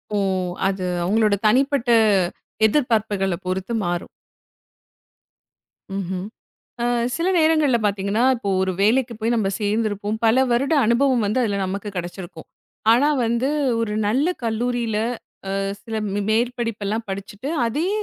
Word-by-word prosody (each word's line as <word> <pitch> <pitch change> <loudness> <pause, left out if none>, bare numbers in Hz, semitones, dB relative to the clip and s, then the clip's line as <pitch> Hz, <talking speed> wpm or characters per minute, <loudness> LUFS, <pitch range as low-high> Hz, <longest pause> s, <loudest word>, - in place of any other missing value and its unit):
ஓ, - - +2 0.5
அது 190 -1 -2 0.2
அவங்களோட 210 +3 +2
தனிப்பட்ட 265 +2 +2 0.8
எதிர்பார்ப்புகள 215 -6 +1
பொறுத்து 190 +4 -3
மாறும். 175 0 -2 1.9
ம்ஹ்ம். 185 -1 -3 0.6
அ - - 0 0.3
சில 340 +2 -1
நேரங்கள்ல 310 -5 +3
பாத்தீங்கன்னா, 200 +2 0
இப்போ 215 -4 -4
ஒரு 190 0 0
வேலைக்கு 235 +4 +2
போய், 230 +2 +1
நம்ம 215 -4 +1
சேர்ந்துருப்போம். 210 0 -1
பல 240 +4 +4
வருட 270 +6 +2
அனுபவம் 245 +1 +3
வந்து, 215 +5 0
அதுல 205 -3 0
நமக்குக் 200 +2 -5
கெடைச்சிருக்கும். 175 -1 -7 0.4
ஆனா 250 +6 +4 0.2
வந்து, 235 +4 0 0.3
ஒரு 215 -2 -2
நல்ல 260 +9 +2 0.2
கல்லூரியில 235 -1 -1 0.6
அ - - 0 0.2
சில 225 -1 -5 0.2
மே 205 - 0
மேற்படிப்புலாம் 230 -2 -1
படிச்சிட்டு, 200 +7 -6 0.2
அதே 300 +10 -1
220 Hz, 120 wpm, -22 LUFS, 200-245 Hz, 1.9 s, பல